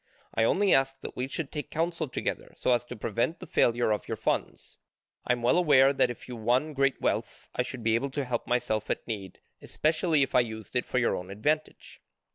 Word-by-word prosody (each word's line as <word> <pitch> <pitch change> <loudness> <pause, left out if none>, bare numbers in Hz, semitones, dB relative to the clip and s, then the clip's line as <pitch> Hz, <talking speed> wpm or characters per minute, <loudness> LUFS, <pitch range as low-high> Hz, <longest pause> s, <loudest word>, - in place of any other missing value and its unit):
I 110 - +2
only 200 - +3
ask 135 0 +2
that - - -7
we 125 +1 -2
should 140 +1 -4
take 150 - -5
counsel 165 0 -1
together - - -4
so 125 - +2
as 120 - +1
to 120 - -8
prevent 115 +8 -1
the 185 - -8
failure 120 -7 +2
of 105 - -1
your - - -3
funds. - - -2 0.5
I - - +4
am 120 -1 -4
well 125 +9 +4
aware 140 -5 +5
that 130 - +3
if 120 - -8
you 125 - -6
won 125 +7 +1
great 135 -2 +1
wealth, - - -2
I - - 0
should 125 -1 -5
be 110 0 +2
able 135 +5 +1
to 140 - 0
help 120 -2 -3
myself 110 -3 0
at - - -2
need, 100 -5 -6 0.2
especially 155 -1 +1
if - - -3
I - - +6
used 110 -2 -4
it 125 - +1
for - - -2
your 120 - +2
own 90 +1 -6
advantage. 150 +11 -2
125 Hz, 225 wpm, -28 LUFS, 115-145 Hz, 0.5 s, I